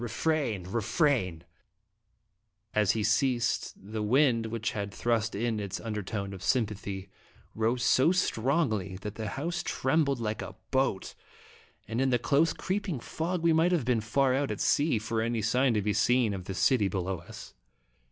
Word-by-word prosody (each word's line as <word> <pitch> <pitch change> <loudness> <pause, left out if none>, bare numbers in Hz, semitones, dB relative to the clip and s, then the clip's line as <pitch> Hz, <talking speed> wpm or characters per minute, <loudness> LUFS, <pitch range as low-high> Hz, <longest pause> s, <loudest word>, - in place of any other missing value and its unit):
Refrain! 120 - -1
Refrain! 110 - 0 1.3
As 105 -2 +3
he 110 - -1
ceased, 120 +3 +1
the 110 +3 -6
wind, 115 0 +3
which 110 0 -2
had 100 -1 -4
thrust 115 0 0
in 110 +1 -1
its 100 -1 -4
undertone 105 -2 -4
of 95 - -9
sympathy, 100 -4 -1 0.5
rose 115 +2 0
so 130 +7 +4
strongly 120 - 0
that 105 - -5
the 110 -1 -5
house 165 - -3
trembled 140 -1 +1
like 110 -2 -2
a - - -7 0.2
boat, 130 -7 0 0.7
and 115 +3 -1
in 135 - +2
the 125 - +3
close, 145 +7 +2
creeping 190 - -3
fog 165 +7 -3
we 165 -1 +4
might 165 +3 +3
have 165 -9 +1
been 120 -3 +2
far 130 +4 +2
out 135 +1 0
at - - -4
sea, 145 -4 +2
for 110 +1 -2
any 115 -1 -1
sign 125 +2 +2
to 105 - +1
be 105 0 +1
seen 125 -3 +2
of 95 -2 -6
the 95 - -5
city 115 -2 +3
be 95 - -3
low 95 0 -2
us. 85 - -11
115 Hz, 170 wpm, -29 LUFS, 105-135 Hz, 1.3 s, so